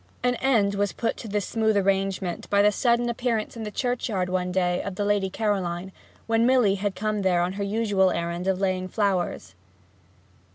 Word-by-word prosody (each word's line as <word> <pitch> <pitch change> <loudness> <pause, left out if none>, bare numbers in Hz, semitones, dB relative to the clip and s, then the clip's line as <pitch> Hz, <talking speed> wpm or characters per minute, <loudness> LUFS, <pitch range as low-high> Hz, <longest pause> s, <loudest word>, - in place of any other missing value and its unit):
An 250 0 +3
end 225 -7 +2
was 200 0 -1
put 230 - -1
to - - -8
this 205 -2 -1
smooth 220 -2 +1
arrangement 195 -2 -1
by 200 0 +4
the 210 - +5
sudden 240 +1 +1
appearance 235 -2 -2
in 230 - -7
the - - -3
churchyard 220 -6 -2
one 180 0 -1
day 180 -1 +1
of 195 -2 -5
the 205 - -1
Lady 205 -2 +1
Caroline, 190 -3 -2 0.3
when 230 +1 +2
Milly 250 -6 +4
had 200 0 -2
come 210 +2 -1
there 180 -2 +2
on 180 +1 -2
her 200 +1 -3
usual 200 -2 +2
errand 170 +1 -3
of 190 -1 +1
laying 185 -1 0
flowers. 190 - -1
200 Hz, 190 wpm, -25 LUFS, 185-220 Hz, 0.3 s, the